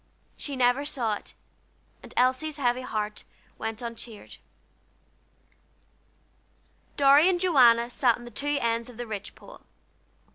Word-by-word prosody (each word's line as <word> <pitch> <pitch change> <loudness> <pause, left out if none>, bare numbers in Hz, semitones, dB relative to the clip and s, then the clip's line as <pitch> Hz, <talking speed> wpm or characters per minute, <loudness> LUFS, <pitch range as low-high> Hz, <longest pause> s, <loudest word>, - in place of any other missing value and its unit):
She 285 - -6
never 250 +2 +2
saw 245 -7 -1
it, 205 - -7 0.7
and - - -13
Elsie's 260 +5 +1
heavy 250 -2 0
heart 210 -3 -4 0.4
went 225 +1 -4
uncheered. 230 -2 -9 2.6
Dorry 285 +4 +6
and 360 -2 +1
Joanna 245 -10 +5
sat 245 -2 +2
on 240 - -12
the 240 - -10
two 290 +5 -1
ends 230 +1 -1
of 240 - -13
the 240 - -5
ridge 205 -3 -7
pole. - - -15
245 Hz, 130 wpm, -27 LUFS, 230-280 Hz, 2.6 s, Dorry